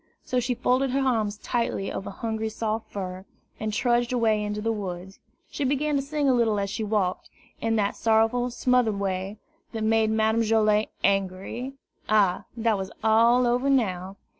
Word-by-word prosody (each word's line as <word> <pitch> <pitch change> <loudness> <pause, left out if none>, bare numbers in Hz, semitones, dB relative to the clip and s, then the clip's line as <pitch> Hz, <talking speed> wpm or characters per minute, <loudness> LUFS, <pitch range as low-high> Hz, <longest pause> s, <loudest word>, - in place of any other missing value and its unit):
So 255 - 0
she 245 +1 -1
folded 255 +3 +1
her 265 +2 0
arms 215 -4 0
tightly 230 -3 -2
over 195 - -5
Hungry's 220 +1 -4
soft 220 0 -3
fur, 185 -1 -5 0.4
and 215 0 -2
trudged 240 +2 +1
away 225 -4 +2
into 210 0 -3
the 225 +2 0
woods. 190 -3 -6 0.3
She 290 - -3
began 285 +2 +1
to 275 - +2
sing 290 +1 -1
a 265 - +5
little 225 -4 +2
as 200 -1 -2
she 220 - -3
walked, 205 -4 -1 0.3
in 225 0 +1
that 205 -2 0
sorrowful, 225 +2 +2
smothered 245 -4 +1
way, 195 +1 -3 0.4
that 220 -1 -3
made 220 0 +3
Madame 220 +1 +2
Joilet 215 -1 +2
angry. 195 +6 -1 0.4
Ah, 205 -4 +3
that 225 -3 +1
was 190 0 -4
all 230 +3 +5
over 245 +3 +1
now! 190 -8 0
220 Hz, 170 wpm, -26 LUFS, 205-245 Hz, 0.4 s, a